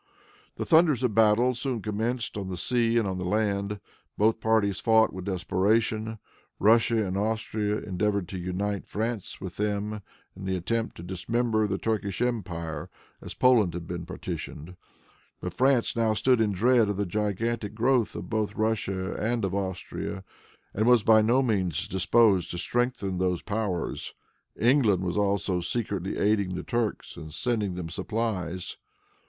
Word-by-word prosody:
The - - -3
thunders 155 -6 +4
of 125 -4 +1
battle 110 +3 +4
soon 125 0 -3
commenced 115 +4 -2
on 100 -2 -4
the 90 - -4
sea 120 +4 +1
and 115 -3 +2
on 95 -1 -3
the - - -3
land. 100 +1 0 0.4
Both 110 +2 +3
parties 110 -3 +2
fought 110 -1 +4
with 95 -1 -6
desperation. 110 +4 0 0.4
Russia 110 +1 +4
and 95 0 -3
Austria 105 0 -1
endeavored 100 -1 -1
to 95 - -5
unite 95 +3 -3
France 110 -1 -3
with 95 -2 -7
them, 105 0 -2 0.3
in 95 0 -8
the 95 0 0
attempt 115 +6 -2
to 85 - -8
dismember 110 +5 0
the 95 -1 -1
Turkish 100 -4 -2
empire 85 -10 -3 0.3
as - - -8
Poland 110 -9 +4
had 85 -1 -5
been 85 0 -5
partitioned, 85 +5 -6 0.6
but - - -5
France 130 -2 +2
now 115 -2 +2
stood 120 +2 +3
in 105 -2 +2
dread 115 +3 +3
of 100 - -2
the 100 - 0
gigantic 105 +2 -2
growth 120 0 +2
both 110 -2 -2
of - - -17
Russia 100 -4 -1
and 115 -1 0
of 95 - -3
Austria, 95 0 -4 0.5
and 110 +3 +1
was 125 -3 +6
by 110 0 +6
no 120 +5 +3
means 95 - 0
disposed 95 0 +3
to 85 - -4
strengthen 120 -2 -1
those 90 -2 0
powers. 100 -5 -3 0.4
England 115 -7 +3
was 90 -1 -2
also 100 -2 +1
secretly 95 0 -3
aiding 100 -3 +1
the 90 - -4
Turks 120 -3 -2
and 80 - -8
sending 105 0 -1
them 90 -2 -5
supplies. 95 -5 -3
105 Hz, 160 wpm, -27 LUFS, 95-115 Hz, 0.6 s, was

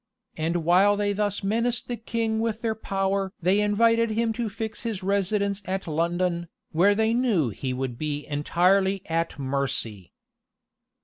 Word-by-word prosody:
And 165 +2 -1
while 195 +4 +5
they 205 0 +1
thus 205 0 -1
menaced 230 +4 0
the 245 - -2
king 225 -1 -2
with 225 -1 -1
their 225 -1 +1
power 195 -2 -1
they 185 +4 +2
invited 230 +2 +3
him 225 +1 0
to 230 -1 -2
fix 220 +2 -5
his 220 -5 -4
residence 200 +1 0
at 190 +1 -3
London, 170 +2 -1 0.2
where 195 +6 +4
they 220 +1 +2
knew 225 - +2
he 130 +5 -4
would 125 -2 -3
be 150 -1 -3
entirely 185 +6 +2
at 165 -1 -1
mercy. 130 -9 -2
195 Hz, 150 wpm, -25 LUFS, 165-220 Hz, 0.2 s, while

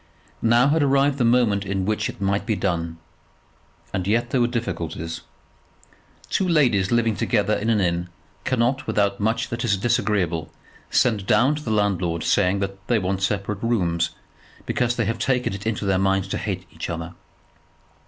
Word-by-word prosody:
Now 120 +4 +4
had 160 +2 +2
arrived 140 0 +2
the - - +3
moment 115 -4 +3
in 95 -1 -2
which 105 +1 0
it - - -9
might 100 +1 0
be 110 - +1
done. 85 -4 -2 1.0
And 95 -1 -2
yet 120 +4 +1
there 130 - +2
were 120 - +3
difficulties. 85 -9 -4 1.1
Two 190 - 0
ladies 125 - +3
living 115 -2 +2
together 105 -1 +1
in 110 +2 -1
an 110 -2 +3
inn 85 -1 0 0.3
cannot, 130 +1 0
without 100 -2 +1
much 110 +2 0
that 120 0 -3
is 105 -4 +2
disagreeable, 95 -8 0 0.4
send 105 -6 +2
down 135 +4 +4
to 150 - -4
the 120 - -4
landlord 95 -6 0
saying 100 0 +2
that 95 0 -5
they 120 - +3
want 95 -1 -1
separate 100 +1 -1
rooms, 85 -8 +1 0.6
because 120 0 0
they 115 - 0
have 115 +1 -2
taken 125 -6 0
it 100 +2 -5
into 105 -2 -2
their 95 -1 +2
minds 95 0 +1
to - - -2
hate - - -4
each - - -6
other. 85 0 -5
105 Hz, 175 wpm, -23 LUFS, 95-120 Hz, 1.1 s, Now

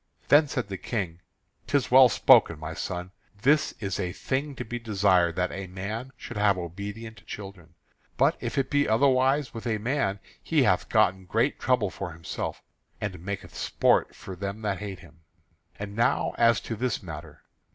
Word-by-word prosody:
Then 150 +1 +6
said 125 -5 -3
the 95 - -5
King: 90 -8 -3 0.5
"'Tis 140 -3 +1
well 130 0 +8
spoken, 85 -5 +5
my 80 +1 -6
son. 90 +2 -5 0.3
This 150 +3 +3
is 95 -3 -3
a 90 -2 -2
thing 140 +2 -2
to - - -5
be 120 +2 -5
desired, 95 -6 +2
that 90 0 0
a 95 0 -5
man 105 +8 -5
should - - -8
have 105 -2 +3
obedient 100 +6 -7
children. 95 -5 -9 0.4
But - - +4
if - - -4
it 135 -1 0
be 145 -3 +2
otherwise 135 +3 +3
with 115 +1 -6
a 110 -2 +1
man, 110 -3 -1 0.2
he - - +2
hath - - +2
gotten 95 +1 +2
great 115 +9 0
trouble 125 -7 +1
for 90 -1 -6
himself, 85 0 -5 0.4
and 95 -4 -4
maketh 100 0 -5
sport - - +2
for 95 - -8
them 100 +4 -5
that 100 -3 -1
hate 100 -3 -6
him. 80 -1 -17 0.6
And 100 0 -6
now 120 +4 +1
as 115 -2 +4
to 115 - -5
this 120 -1 -2
matter. 75 -3 -9
100 Hz, 175 wpm, -27 LUFS, 90-120 Hz, 0.6 s, well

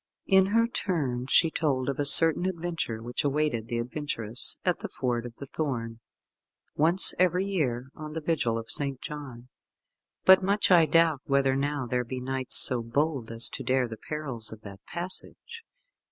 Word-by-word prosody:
In 190 0 +3
her 230 +3 +2
turn 140 - -3
she 160 +4 +3
told 135 -6 -1
of 140 0 -3
a 145 - 0
certain 165 +5 +7
adventure 165 -11 -4
which 120 +1 -4
awaited 140 -6 -1
the 120 - -4
adventurous 120 -2 -1
at - - 0
the - - -6
Ford 120 -2 -3
of 115 - -14
the 140 - -9
Thorn, 120 -6 -5 0.8
once 170 +5 +4
every 180 +1 +1
year, 130 -10 -3
on 155 0 -9
the 160 - -4
vigil 150 -8 -1
of 115 0 -4
St. 140 -1 -2
John, 130 -5 -9 0.8
"but 190 0 +7
much 200 +1 0
I 170 -3 +5
doubt 165 -4 +2
whether 135 -1 +1
now 145 0 -2
there 125 +1 -2
be 125 +2 -6
knights 130 0 +3
so 125 -2 +6
bold 135 +1 -2
as 115 0 0
to 135 - -7
dare 130 0 0
the 110 -1 -9
perils 130 -8 -4
of 110 -1 -11
that 100 -2 -12
passage." 185 - -3
140 Hz, 175 wpm, -26 LUFS, 120-165 Hz, 0.8 s, certain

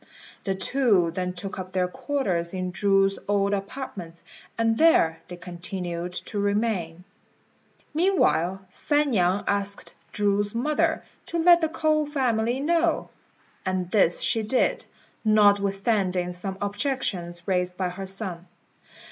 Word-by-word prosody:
The 195 -2 0
two 195 -4 +2
then 180 0 -2
took 190 +2 -6
up 185 0 -7
their 185 -1 +1
quarters 185 - -2
in 185 -1 -3
Chu's 195 0 +2
old 200 0 +1
apartments, 195 -5 -6 0.3
and 225 0 +2
there 165 - +4
they 180 - -8
continued 175 0 -5
to 205 - -4
remain. 200 -5 -1 0.9
Meanwhile 295 - +2
San 290 +9 0
niang 185 -2 +2
asked 200 0 -2 0.2
Chu's 205 +1 0
mother 295 +6 +1 0.2
to 340 - -3
let 345 +1 +6
the 320 - +1
K'ou 310 -2 0
family 245 -3 0
know; 335 +3 +1 0.5
and 185 -1 -2
this 185 -5 +3
she 225 - +2
did, 220 +4 0 0.4
notwithstanding 200 -3 +2
some 190 +2 -4
objections 200 -6 -2
raised 180 -1 0
by 185 -2 -1
her 190 +2 -7
son. 190 -3 -3
200 Hz, 125 wpm, -25 LUFS, 180-235 Hz, 0.9 s, let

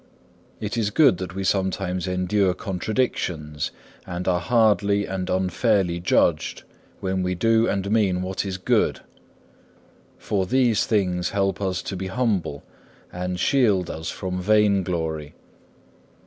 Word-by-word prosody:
It 105 +2 -4
is 110 -3 +1
good 135 - +4
that 95 0 -6
we 95 - -3
sometimes 95 -1 -1
endure 90 +1 +1
contradictions, 90 - -2 0.4
and 90 0 -4
are 90 -1 +2
hardly 100 -1 +2
and 95 -1 -4
unfairly 95 0 +1
judged, 85 -2 +1 0.4
when 95 0 -1
we 90 0 -1
do 115 +4 +3
and 100 0 -1
mean 95 -5 +2
what 95 0 -2
is 95 -2 -4
good. 95 - +1 1.2
For 95 -3 -1
these 120 -3 +2
things 90 -5 +1
help 95 -1 -1
us 95 -2 -1
to 95 - -4
be 95 +1 -4
humble, 95 - -1 0.5
and 90 0 -3
shield 105 -9 +2
us 80 +1 -5
from 90 -1 -4
vain 105 0 +3
glory. 80 -4 -3
95 Hz, 135 wpm, -24 LUFS, 90-105 Hz, 1.2 s, good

